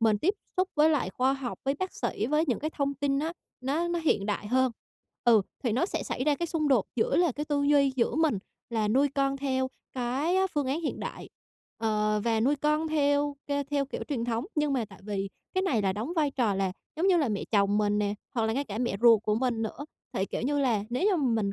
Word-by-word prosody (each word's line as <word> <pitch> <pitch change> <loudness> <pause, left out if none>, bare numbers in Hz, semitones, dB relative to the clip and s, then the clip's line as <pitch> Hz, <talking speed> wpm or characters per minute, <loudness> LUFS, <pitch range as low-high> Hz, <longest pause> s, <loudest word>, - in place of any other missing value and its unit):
mình 220 -2 +3
tiếp 385 - +1 0.2
xúc 370 +1 +2
với 310 +1 +5
lại 270 - +1
khoa 255 +7 +2
học, 270 -3 -4
với 275 +1 +1
bác 370 +5 -4
sĩ, 230 -3 -2
với 300 +3 +2
những 250 - 0
cái 310 +2 -3
thông 280 -2 -1
tin 275 0 0
á, 320 +3 -1 0.3
nó 295 +7 0
nó 345 0 0
hiện 220 -11 +1
đại 210 0 -2
hơn. 255 +2 +2 0.5
Ừ, 225 -4 +6 0.2
thì 240 - +1
nó 260 +11 +2
sẽ - - -3
xảy 255 - -3
ra 300 -1 +3
cái 340 +3 -2
xung 310 -2 0
đột 245 -7 +3
giữa 220 - +2
là 345 -4 +3
cái 295 +4 -4
tư 290 -1 0
duy 285 -2 +4
giữa 235 - +1
mình 315 -9 +2 0.3
là 220 -2 0
nuôi 270 +6 +3
con 275 0 +1
theo 260 -1 0 0.2
cái 265 +8 0
á 380 0 +3
phương 290 -6 -2
án 280 +6 -1
hiện 315 - -3
đại, - - -6 0.5
ờ, 215 -1 +1
và 225 -1 +2
nuôi 280 +5 +3
con 300 +3 +1
theo 285 -1 +1
k - - -13 0.2
theo 285 -1 +1
kiểu - - -5
truyền 245 -5 -1
thống. 235 +1 -1
Nhưng 300 -2 +1
mà 250 -4 +1
tại - - -15
vì 200 -1 -3 0.3
cái 375 - +2
này 250 - +1
là 190 -1 +2
đóng 225 - -4
vai 300 -3 +2
trò 240 -7 +1
là, 190 -1 0 0.2
giống 350 +4 +1
như 375 - +5
là, 300 -6 +2
mẹ 205 -2 -2
chồng 205 -1 +3
mình 210 0 +2
nè 205 0 0 0.2
hoặc 230 - +1
là 220 - 0
ngay 280 +4 -1
cả 210 -3 -5
mẹ 240 -5 0
ruột 230 -3 +6
của 210 -1 +1
mình 235 -1 0
nữa, 255 +6 -4 0.3
thì, 190 - 0
kiểu - - -4
như 290 +3 +1
là, 230 -7 +1
nếu 250 +8 -1
như 380 - +2
mà 285 -6 +1
mình 200 0 -1
265 Hz, 255 wpm, -28 LUFS, 220-295 Hz, 0.5 s, Ừ